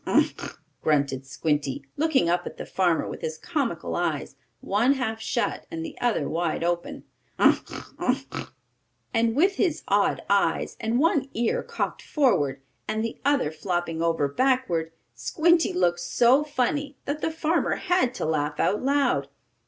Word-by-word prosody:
"Ugh! - - +5
Ugh!" - - -8 0.2
grunted 140 -3 +1
Squinty, 145 -1 -1
looking 295 - +2
up 175 +1 +1
at - - -8
the - - -6
farmer 175 -4 +1
with - - -7
his 155 0 -3
comical 285 - -2
eyes, - - -2 0.2
one 230 +7 +2
half 225 -5 -3
shut - - -2
and 330 -1 -5
the 315 -1 -7
other 240 -2 +1
wide 165 -1 -1
open. 175 0 -2 0.3
"Ugh! - - +2 0.2
Ugh!" - - -2 0.6
And 225 0 +2
with 380 +7 +3
his 335 -5 0
odd 200 +1 +2
eyes, 200 0 +1
and 225 +2 0
one 280 -2 +2
ear 230 0 +1
cocked - - -3
forward, 145 - +1 0.2
and 220 0 -1
the 230 - -6
other 280 - +2
flopping 170 0 -2
over 165 -3 +1
backward, 175 - +1 0.2
Squinty 330 - +2
looked 175 -1 +1
so 240 +10 +4
funny 285 0 -1
that 295 +2 -3
the - - +1
farmer 320 +1 0
had 355 -9 +1
to - - -2
laugh 150 -1 -1
out 210 - +2
loud. 270 - +2
225 Hz, 155 wpm, -26 LUFS, -, 0.6 s, Ugh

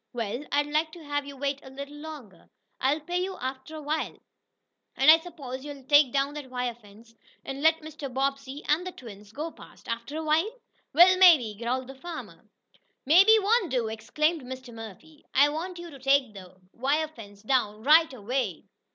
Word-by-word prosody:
"Well, 235 +2 -3
I'd 290 0 +2
like 305 +2 0
to 340 - -11
have 290 -1 -3
you 280 -1 -9
wait 280 0 -2
a 265 - -12
little 280 +2 -9
longer. 295 - -11 0.3
I'll 285 +4 +1
pay 355 +4 -2
you 380 0 -5
after 260 +4 -6
a 310 - -7
while." 310 +2 -2 0.8
"And 270 +3 +7
I 325 - +7
suppose 285 -7 -8
you'll 285 -2 -9
take 290 -1 +5
down 275 +1 0
that 295 -3 -8
wire 250 -1 -2
fence, 225 0 -18 0.3
and 270 +1 -5
let 320 +1 +4
Mr. 305 -3 -7
Bobbsey 275 +2 -2
and 325 +5 +1
the - - -4
twins 210 -4 -12
go 310 +7 -5
past - - -16
after 235 +6 -4
a 320 - -3
while?" 315 +6 +2 0.4
"Well 365 +4 +6
maybe," 310 - +7
growled 240 +4 -2
the 265 - -9
mean 265 - -22
farmer. 345 -2 -9 0.6
"Maybe 385 +10 +7
won't 430 -1 +2
do!" 245 -4 0
exclaimed 300 +9 -1
Mr. 255 -1 -9
Murphy. 225 - -11
"I 285 +2 +6
want 345 +4 -5
you 345 -1 -9
to 275 - -12
take 270 -3 +2
the 185 -2 -12 0.2
wire 290 +6 0
fence 205 -9 -13
down 215 -4 0
RIGHT 310 +2 +5
AWAY." 235 - -3
280 Hz, 190 wpm, -27 LUFS, 250-315 Hz, 0.8 s, And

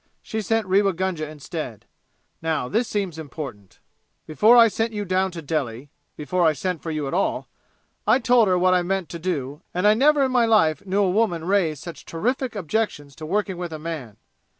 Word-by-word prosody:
She 220 - -3
sent 225 +2 0
Rewa 195 +1 +3
Gunga 170 -3 -2
instead. 150 - -7 0.6
Now, 160 -5 -1
this 225 - 0
seems 190 -6 -3
important: 135 - -8 0.5
"Before 215 +10 +5
I 230 -1 +8
sent 225 +1 -2
you 205 -1 -3
down 185 +1 +1
to 170 -3 -8
Delhi 140 -3 -3 0.3
before 175 +4 -1
I 160 -2 +4
sent 180 +3 -3
for 165 - -5
you 155 -3 -2
at 135 - -4
all 190 - 0 0.6
I 220 +3 +6
told 240 -3 +4
her 185 -1 +3
what 185 +1 +3
I 180 - +3
meant 185 -2 -2
to 170 - -6
do, 150 -5 -3
and 180 +2 0
I 210 - +7
never 285 +5 +4
in 260 - -1
my 245 -2 +3
life 160 -10 +3
knew 200 +2 +2
a 190 - +2
woman 180 -6 +1
raise 175 -6 +1
such 170 - -9
terrific 245 +8 -2
objections 165 -7 -2
to 155 - -7
working 195 0 -1
with 175 -1 -5
a 155 - -5
man. 150 -9 -6
180 Hz, 200 wpm, -23 LUFS, 155-210 Hz, 0.6 s, I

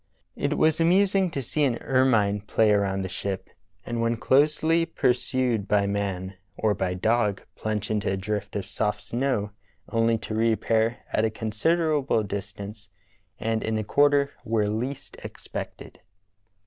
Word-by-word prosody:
It - - -1
was 160 0 +3
amusing 190 +2 +3
to 140 -5 -4
see 150 +5 0
an 125 -4 +2
ermine 115 -7 +2
play 105 +1 +2
around 95 -2 +1
the - - -3
ship, 95 +1 -4 0.3
and 120 -1 -2
when 115 0 +1
closely 155 +6 +3
pursued 125 -7 0
by 100 0 +3
man 100 -2 -3 0.2
or 110 -1 +2
by 90 -2 -2
dog 105 0 +1
plunge 110 -1 -3
into 105 -1 0
a 95 - -1
drift 100 +1 -4
of 100 -2 -2
soft 105 +1 -1
snow 120 -5 -1 0.4
onl}' 115 -1 +2
to - - -5
reappear 115 +1 +1 0.2
at 110 - +2
a 110 - +3
considerable 135 +4 +1
distance 100 0 -6 0.5
and 110 0 -1
in 110 0 -1
a 110 - -1
quarter 145 +4 +3
where 110 -3 +1
least 125 +6 -4
expected. - - -8
110 Hz, 150 wpm, -26 LUFS, 100-130 Hz, 0.5 s, was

